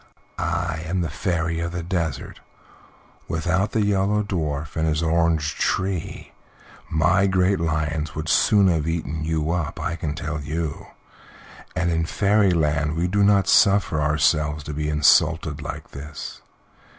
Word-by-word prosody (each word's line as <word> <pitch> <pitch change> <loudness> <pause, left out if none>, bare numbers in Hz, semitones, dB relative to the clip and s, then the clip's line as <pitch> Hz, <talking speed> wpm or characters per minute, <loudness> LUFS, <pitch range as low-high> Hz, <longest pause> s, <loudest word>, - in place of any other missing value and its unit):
I 80 -1 -2
am 90 +2 -1
the 85 -4 -3
Fairy 85 -2 -1
of 85 +1 -3
the 90 -1 -4
Desert; 85 -5 -3 0.9
without 90 +5 0
the 110 -2 +2
Yellow 100 +1 +1
Dwarf 80 -7 -3
and 80 0 0
his 80 +1 0
orange 80 -2 +1
tree 95 -2 -2 0.6
my 85 +5 +3
great 95 +1 +2
lions 80 -1 -2
would 80 0 -4
soon 100 +4 +4
have 80 -4 +1
eaten 80 -2 -3
you 80 0 -1
up, 85 -4 -2
I 85 -1 -2
can 75 -2 -4
tell 75 0 -4
you, 80 +1 -4 0.9
and 85 -1 0
in 80 -1 0
Fairyland 85 -8 +2
we 85 +2 0
do 100 +3 +2
not 100 -2 +4
suffer 100 -6 +4
ourselves 75 0 +1
to 75 - -6
be 75 +1 -2
insulted 75 0 +3
like - - -7
this. 75 +1 -8
80 Hz, 145 wpm, -23 LUFS, 75-90 Hz, 0.9 s, soon